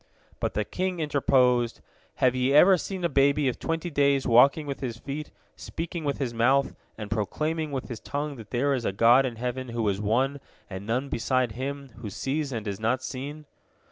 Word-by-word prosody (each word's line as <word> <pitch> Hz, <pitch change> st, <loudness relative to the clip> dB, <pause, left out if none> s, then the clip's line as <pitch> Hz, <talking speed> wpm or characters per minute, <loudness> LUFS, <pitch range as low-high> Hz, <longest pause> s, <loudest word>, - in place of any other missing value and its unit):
But -, -, -2 dB
the 105 Hz, -, 0 dB
king 185 Hz, -1 st, -2 dB
interposed, 130 Hz, -5 st, +2 dB, 0.4 s
"Have 125 Hz, -1 st, +3 dB
ye 130 Hz, +2 st, +1 dB
ever 185 Hz, +6 st, +8 dB
seen 185 Hz, +1 st, -5 dB
a -, -, +3 dB
baby 140 Hz, -1 st, +3 dB
of 125 Hz, -, -2 dB
twenty 165 Hz, +1 st, -3 dB
days 140 Hz, -2 st, +2 dB
walking 135 Hz, +6 st, +5 dB
with 140 Hz, -1 st, -5 dB
his 120 Hz, -4 st, -4 dB
feet, 145 Hz, +5 st, -6 dB, 0.3 s
speaking 165 Hz, 0 st, -5 dB
with 140 Hz, -, -1 dB
his 125 Hz, -4 st, -2 dB
mouth, 130 Hz, +4 st, +2 dB, 0.2 s
and 105 Hz, -2 st, -7 dB
proclaiming 155 Hz, +9 st, -1 dB
with 135 Hz, -2 st, -4 dB
his 120 Hz, -, -6 dB
tongue 145 Hz, 0 st, -4 dB
that 110 Hz, -2 st, -11 dB
there 140 Hz, +3 st, +1 dB
is 130 Hz, -3 st, -1 dB
a -, -, 0 dB
God 120 Hz, +6 st, +5 dB
in 120 Hz, -, -6 dB
heaven, 125 Hz, +2 st, -4 dB
who 115 Hz, -2 st, -1 dB
is 100 Hz, 0 st, 0 dB
One, 130 Hz, +7 st, +1 dB, 0.3 s
and 95 Hz, +2 st, -7 dB
none 125 Hz, +5 st, -1 dB
beside 130 Hz, -1 st, 0 dB
Him, 135 Hz, +3 st, -5 dB
who 115 Hz, -3 st, -6 dB
sees 140 Hz, +8 st, -2 dB
and 110 Hz, -3 st, -4 dB
is 100 Hz, -1 st, -4 dB
not 120 Hz, +4 st, 0 dB
seen?" 145 Hz, +4 st, -6 dB
130 Hz, 200 wpm, -26 LUFS, 115-145 Hz, 0.4 s, ever